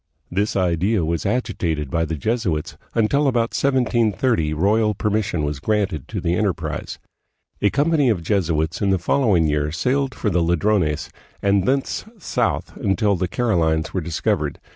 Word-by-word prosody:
This 100 +4 0
idea 90 +1 +1
was 85 +1 -1
agitated 85 - -1
by 80 0 +1
the 80 +1 -3
Jesuits, 90 - -1 0.2
until 140 +6 +2
about 120 -3 +1
1730 120 - +1
royal 105 +7 +2
permission 100 -6 -1
was 75 -1 -2
granted 100 -5 -1
to - - -4
the 85 - 0
enterprise. 95 -2 -2 0.6
A 100 - +4
company 145 - +2
of 95 -7 0
Jesuits 80 -4 0
in 100 - +2
the 95 - +3
following 95 -2 +2
year 75 0 0
sailed 130 - 0
for 105 - -1
the 90 -1 +2
Ladrones 85 -2 +1 0.3
and 100 -1 +2
thence 135 +1 0
south 190 - -2
until 100 +1 +1
the 90 0 -1
Carolines 80 -10 0
were 95 - -1
discov 80 -1 0
ered. - - -3
95 Hz, 155 wpm, -21 LUFS, 80-115 Hz, 0.6 s, A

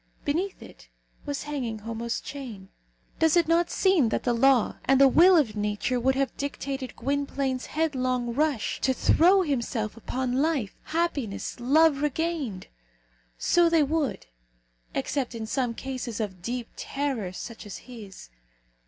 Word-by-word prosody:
Beneath 350 +7 -2
it - - -15 0.4
was 285 -1 -3
hanging 265 -7 -3
Homo's 230 +2 -4
chain. 230 -9 -8 0.5
Does 320 +1 +4
it 340 - +3
not 335 +1 +3
seem 370 - +3
that - - -1
the 245 - +1
law 255 0 +3
and 270 0 +4
the 275 - +8
will 350 +7 +6
of 235 -9 +2
nature 210 +4 -1
would 265 +2 +2
have 270 -2 -1
dictated 275 -2 -4
Gwynplaine's 275 0 -2
headlong 255 -6 -1
rush 285 -4 0
to 260 -1 +2
throw 370 +8 +5
himself 235 -7 -2
upon 255 +3 -2
life, 285 -10 0
happiness, 295 -12 -2
love 290 +3 +4
regained? 295 - -2 0.7
So 345 -1 +3
they 330 -2 +4
would, 295 -1 -1 0.7
except 260 -4 -2
in 225 -1 -4
some 240 0 -1
case 255 -4 -5
of 190 -5 -4
deep 240 +4 -4
terror 270 -9 -3
such 220 +3 -8
as 200 - -7
his. 205 - -11
265 Hz, 145 wpm, -27 LUFS, 230-300 Hz, 0.7 s, the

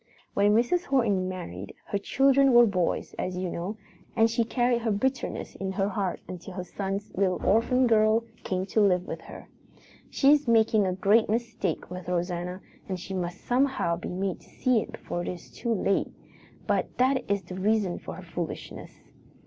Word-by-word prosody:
"When 205 +1 +4
Mrs. 290 +11 +2
Horton 210 -9 +1
married, 100 - -7
her 200 - -2
children 275 +4 +4
were 240 0 +8
boys, 185 -5 -1
as 180 0 -2
you 180 -1 -2
know, 190 +6 -4 0.4
and 225 0 +4
she 235 0 +2
carried 240 +1 +1
her 225 - -1
bitterness 260 +6 -1
in 190 0 -4
her 195 +1 0
heart 195 -2 -2
until 180 +1 -8
her 185 - -3
son's 195 +2 -4
little 185 -1 +1
orphan 240 +5 +3
girl 220 -1 +4 0.2
came 185 0 -1
to 215 +3 +1
live 180 -3 +3
with - - -6
her. - - -11 0.6
She 275 0 +4
is 295 -3 +3
making 220 -3 +4
a 185 - 0
great 205 +4 +3
mistake 225 -7 -2
with 180 -1 -7
Rosanna 180 +1 -2 0.3
and 185 -1 -2
she 195 +2 -7
must 175 -2 -3
somehow 250 -9 +1
be 170 - -6
made 185 0 -2
to - - -21
see 250 -4 +2
it - - -8
before 175 - -5
it - - -5
is 175 -2 -7
too 235 - -3
late. 195 -2 +1 0.6
But - - -1
that 260 -1 +2
is 200 -1 +1
the - - -9
reason 195 -1 +1
for - - -8
her - - -10
foolishness. - - -6
200 Hz, 185 wpm, -27 LUFS, 185-235 Hz, 0.6 s, were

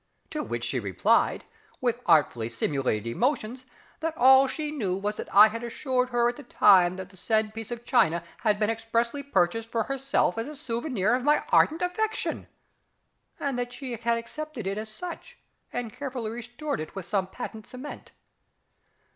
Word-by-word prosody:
To 305 - -2
which 120 - -4
she 125 +2 -1
replied, 100 -5 +2 0.3
with 240 -1 0
artfully 145 -9 +3
simulated 120 -2 -1
emotion, 240 - -1 0.4
that 325 0 -3
all 265 +1 +7
she 300 +2 -3
knew 200 -11 -1
was 205 +2 -2
that - - -6
I 210 +2 +9
had 230 +2 -5
assured 250 +1 -1
her 240 -1 +2
at 240 - -2
the - - -8
time 185 -7 +5
that 190 0 -8
the 190 - -18
said 215 +2 0
piece 225 -1 -7
of 240 0 -6
china 170 -9 +3 0.2
had 210 -2 +2
been 210 +1 +1
expressly 230 +4 -1
purchased 225 -3 0
for 230 -1 0
herself 270 -6 0
as 225 - -3
a 300 - -7
souvenir 235 -5 -1
of 250 0 +1
my 295 +2 +3
ardent 320 +3 +4
affection, 435 +5 -1 0.9
and 245 -3 -2
she 250 -1 -5
had 235 +1 0
accepted 260 +1 -6
it 195 +2 -2
as 220 0 -6
such, 360 - -8 0.3
and 230 -4 -4
carefully 255 -6 -4
restored 240 +6 -4
it 155 - -7
with 195 -3 -5
some 190 +1 0
patent 220 +1 -8
cement. 255 +3 -9
230 Hz, 170 wpm, -27 LUFS, 200-265 Hz, 0.9 s, I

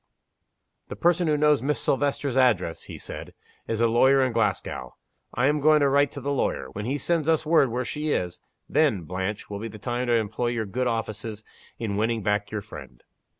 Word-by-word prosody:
"The - - -6
person 175 0 +2
who 150 -1 +2
knows 150 -3 +3
Miss 145 +3 0
Silvester's 140 -1 0
address," 110 -11 +2
he - - -8
said, - - -8 0.3
"is 115 0 -1
a 115 - +5
lawyer 130 +4 +4
in 130 -2 0
Glasgow. 85 - -1 0.4
I 125 - 0
am 150 +2 +2
going 155 +1 +5
to 140 - +4
write 140 +1 +3
to 140 - -6
the 140 +2 -2
lawyer. 70 - -1
When 105 +1 -5
he 135 +4 -1
sends 160 +2 0
us 160 -1 +2
word 155 -4 +4
where 125 +2 -2
she 150 +4 -3
is 90 -10 -1 0.3
then, 135 - +2
Blanche, 95 +5 -4
will 100 -1 -6
be 115 - -4
the 110 -1 -9
time 120 +4 -3
to 120 - +2
employ 115 +1 0
your 120 -2 -1
good 125 +6 -2
offices 110 -2 -3 0.3
in 105 -3 -3
winning 110 0 0
back 105 0 0
your 105 -1 -3
friend." 65 - -12
120 Hz, 205 wpm, -25 LUFS, 105-140 Hz, 0.4 s, a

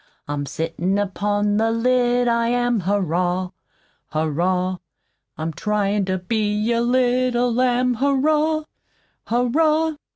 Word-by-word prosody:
I'm 145 -1 -3
sittin' 170 +6 -2
upon 205 +1 0
the 225 +1 +2
lid, 245 +1 +2
I 235 0 +2
am, 245 -1 +1
Hurrah! 180 -1 -1 0.6
Hurrah! 180 +4 -1 0.6
I'm 160 +1 -3
tryin' 205 +2 0
to 185 0 -1
be 210 +3 -1
a 235 0 +1
little 245 0 +1
lamb, 250 0 +2
Hurrah! 300 +4 +1 0.6
Hurrah! 305 +6 +1
225 Hz, 105 wpm, -21 LUFS, 185-250 Hz, 0.6 s, the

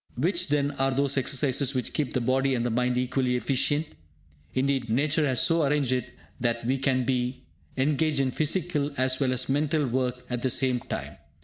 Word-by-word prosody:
Which, 170 +7 0
then, 145 -1 +1
are 135 0 +3
those 140 +1 +1
exercises 135 0 +1
which 125 - -2
keep 145 -4 -2
the 125 - +1
body 130 +2 +1
and 120 -1 -1
the 120 - 0
mind 125 +1 0
equally 125 0 0
efficient? 140 +4 +1 0.7
Indeed, 130 -2 0
Nature 145 +6 +1
has 130 -2 +2
so 165 -1 +2
arranged 140 -2 +1
it 125 0 -2 0.2
that 120 -1 -1
we 130 +2 0
can 130 -1 +1
be 125 0 -1 0.3
engaged 145 +2 +1
in 135 -1 +1
physical 155 -1 0
as 130 0 +2
well 135 -2 +1
as 130 0 0
mental 150 +2 +1
work 125 0 -2
at 120 -1 -3
the 130 - 0
same 130 -1 +1
time. - - -6
130 Hz, 190 wpm, -26 LUFS, 125-145 Hz, 0.7 s, are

